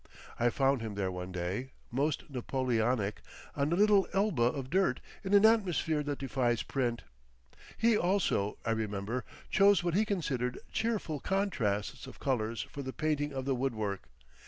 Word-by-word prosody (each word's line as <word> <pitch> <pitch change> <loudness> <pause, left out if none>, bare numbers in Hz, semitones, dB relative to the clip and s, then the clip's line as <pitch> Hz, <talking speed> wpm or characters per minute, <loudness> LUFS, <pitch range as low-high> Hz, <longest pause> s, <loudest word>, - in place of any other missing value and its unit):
I 120 0 +4
found 135 0 +2
him 110 -2 -5
there 95 -2 -1
one 90 0 -5
day, 95 +9 -3 0.2
most 140 +4 0
Napoleonic, 125 -5 0 0.3
on 140 +2 0
a - - +3
little 205 0 +5
Elba 195 - +1
of 130 +2 0
dirt, 190 +2 +2 0.2
in 195 +1 +2
an 200 +1 +7
atmosphere 180 -8 +3
that 145 -1 -3
defies 125 -4 0
print. 120 -4 -1 0.7
He 230 0 +4
also, 175 - +1
I 115 - +1
remember, 110 +2 -2 0.3
chose 200 -2 +5
what 175 -1 0
he 205 +5 +4
considered 135 - -1
cheerful 215 -10 -1
contrasts 125 - -1
of - - -11
colours 115 -4 -1
for 140 - -8
the 130 -1 -5
painting 150 -1 0
of 135 -1 -4
the 135 - +1
woodwork. 110 -7 -2
135 Hz, 160 wpm, -31 LUFS, 115-175 Hz, 0.7 s, an